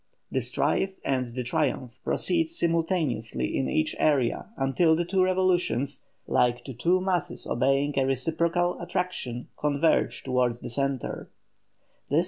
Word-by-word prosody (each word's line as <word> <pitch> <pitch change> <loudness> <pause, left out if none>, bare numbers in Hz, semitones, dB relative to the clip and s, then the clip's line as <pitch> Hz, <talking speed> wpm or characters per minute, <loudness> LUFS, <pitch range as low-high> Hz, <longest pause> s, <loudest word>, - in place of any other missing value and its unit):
The - - 0
strife 195 0 0
and 130 -2 0
the 125 - -2
triumph 125 -1 -1
proceed 330 -2 +1
simultaneously 165 - 0
in 135 - 0
each 155 0 0
area 135 -6 +2
until 160 +5 +3
the 170 +1 0
two 185 +2 +1
revolutions, 180 -8 +1 0.2
like 120 0 +2
to 135 - -7
two 170 +10 +2
masses 180 -2 -2
obeying 135 +3 +1
a 130 - +2
reciprocal 165 +7 0
attraction, 175 -9 -3
converge 150 +2 +1
towards 125 -2 0
the - - -6
centre. 135 0 -2
145 Hz, 125 wpm, -27 LUFS, 125-175 Hz, 0.2 s, until